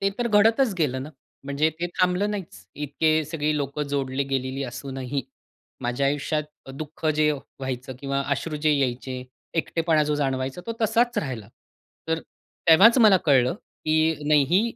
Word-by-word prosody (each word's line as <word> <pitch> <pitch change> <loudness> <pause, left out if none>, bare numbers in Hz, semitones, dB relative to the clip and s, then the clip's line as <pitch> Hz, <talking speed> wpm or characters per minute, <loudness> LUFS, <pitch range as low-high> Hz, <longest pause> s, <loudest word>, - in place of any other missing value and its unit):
ते 195 - +2
तर 240 - 0
घडतच 220 +2 +4
गेलं 130 -4 0
ना. 150 - -8 0.3
म्हणजे 140 +3 +1
ते 175 - 0
थांबलं 180 +3 +2
नाहीच. 160 - -7
इतके 155 +2 +1
सगळी 155 -1 -1
लोकं 140 +1 -2
जोडली 140 -1 -1
गेलेली 130 +1 -2
असूनही, 135 +1 -4 0.6
माझ्या 125 +3 0
आयुष्यात 145 +2 0 0.2
अ, - - -8
दुःख 150 +3 -6
जे 155 0 +4
व्हायचं 130 -2 -6
किंवा 140 0 -1
अश्रू 150 +2 -1
जे 150 0 +2
यायचे, 130 -2 -1 0.3
एकटेपणा 165 -1 +1
जो 150 - 0
जाणवायचा 135 +1 -2
तो 230 - -2
तसाच 235 +2 +2
राहिला. 120 -8 -4 0.6
तर 160 0 0 0.5
तेव्हाच 220 +10 +8
मला 215 -5 +7
कळलं 130 -1 +4 0.3
की 155 +1 +3
नाही 150 -2 +5
ही, 190 +5 +5
150 Hz, 155 wpm, -25 LUFS, 135-165 Hz, 0.6 s, तेव्हाच